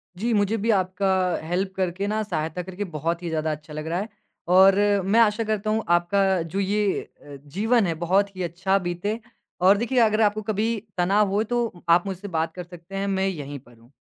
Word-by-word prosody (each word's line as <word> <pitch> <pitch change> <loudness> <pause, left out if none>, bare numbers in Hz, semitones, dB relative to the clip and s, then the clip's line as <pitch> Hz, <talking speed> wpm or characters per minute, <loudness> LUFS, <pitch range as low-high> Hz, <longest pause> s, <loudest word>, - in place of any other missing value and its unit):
जी, 230 +6 -1
मुझे 205 +1 +1
भी 220 +2 -2
आपका 190 0 0 0.4
हेल्प 190 +2 -1
करके 190 +1 -2
ना, 215 +1 0
सहायता 160 -3 -3
करके 190 +3 -5
बहुत 170 +3 -2
ही 170 - -3
ज़्यादा 155 -1 -1
अच्छा 150 0 -8
लग 155 +1 -5
रहा 170 +3 -1
है 215 +3 -4 0.5
और 190 0 +7 0.3
मैं 210 +4 +3
आशा 225 0 +3
करता 215 -1 -2
हूँ, 220 +1 0
आपका 185 +2 +2
जो 165 +4 -4
ये 200 0 +1 0.2
अ, 145 -1 -11
जीवन 215 - +1
है 165 - 0
बहुत 195 +2 +1
ही 185 - -3
अच्छा 185 +3 0
बीते। 180 +5 -3 0.4
और 195 +2 +6
देखिए 240 +3 0
अगर 220 -1 +3
आपको 215 0 +2
कभी 215 +2 -1 0.2
तनाव 195 +3 +3
हो, 205 +2 +1
तो 230 -5 -2
आप 175 +2 +5
मुझसे 195 +1 -5
बात 165 -3 -2
कर 180 - -5
सकते 175 +2 -12
हैं, 195 +1 -2
मैं 190 -1 0
यहीं 145 -6 -5
पर 120 -2 -20
हूँ। 115 +3 -22
190 Hz, 210 wpm, -24 LUFS, 175-210 Hz, 0.5 s, और